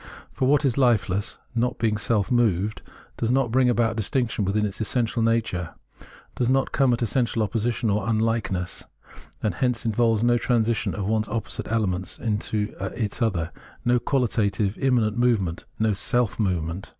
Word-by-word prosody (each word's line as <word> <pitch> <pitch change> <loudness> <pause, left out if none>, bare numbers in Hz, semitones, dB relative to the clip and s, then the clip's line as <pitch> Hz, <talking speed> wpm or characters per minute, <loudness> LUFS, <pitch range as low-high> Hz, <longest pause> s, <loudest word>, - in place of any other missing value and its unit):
For 130 - 0
what 145 +1 +3
is 130 -2 +1
hfeless, 105 -7 +1 0.2
not 120 +1 0
being 110 -2 +1
self 105 -1 0
moved, 110 -4 +1 0.4
does 115 - -1
not 125 -2 +2
bring 130 0 +4
about 115 -2 +1
distinction 115 -1 0
within 105 +2 +1
its 105 +1 -4
essential 115 +1 0
nature; 110 -7 0 0.6
does 120 - 0
not 135 +1 +2
come 135 -2 +3
at 120 0 +1
essential 115 0 0
opposition 115 +2 -1
or 105 +2 0
unlikeness; 110 -5 -1 0.6
and 105 - +1
hence 125 +6 -1
involves 115 0 +2
no 120 0 +3
transition 115 -2 0
of 100 -2 -3
one 110 0 +1
opposite 110 0 -4
element 95 -5 -1
into 105 -1 -1 0.2
its 110 0 -2
other, 90 -8 0 0.3
no 120 0 +3
qualitative, 110 -6 0
immanent 120 -5 +1
movement, 105 -9 +1
no 110 0 +2
seZ/ 120 +3 0
movement. 90 -3 -1
110 Hz, 155 wpm, -24 LUFS, 105-120 Hz, 0.6 s, bring